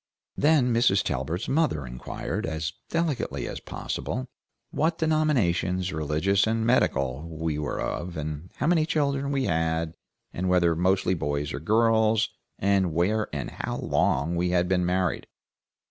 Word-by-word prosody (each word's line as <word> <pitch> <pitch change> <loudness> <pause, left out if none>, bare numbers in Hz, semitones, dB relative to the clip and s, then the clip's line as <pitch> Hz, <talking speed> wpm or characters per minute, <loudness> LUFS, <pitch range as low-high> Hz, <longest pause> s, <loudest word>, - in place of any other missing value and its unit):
Then 145 -5 +3
Mrs. 115 -5 +3
Talbert's 75 - -2
mother 135 - +1
inquired, 60 +5 -4
as 80 0 -3 0.2
delicately 165 -5 -1
as - - -5
possible, 65 - -4 0.5
what 160 +2 +1
denominations, 100 - +1
religious 80 +7 +1
and 110 0 0
medical, 75 - +1
we 80 -2 -2
were 75 - -3
of, 85 0 -3 0.4
how - - -2
many 160 -1 +3
children 140 -3 0
we 135 -1 0
had, 80 -3 0 0.4
and 90 +1 -1
whether 85 -2 +3
mostly 95 +2 +2
boys 75 -2 -2
or - - -3
girls, 110 -1 +3 0.3
and 95 -3 +2
where 105 +6 +1
and 70 -4 -4
how - - -4
long 80 +6 +1
we 90 +1 +1
had 90 0 +2
been 90 -1 +1
married. 90 -2 0
90 Hz, 140 wpm, -26 LUFS, 80-115 Hz, 0.5 s, Then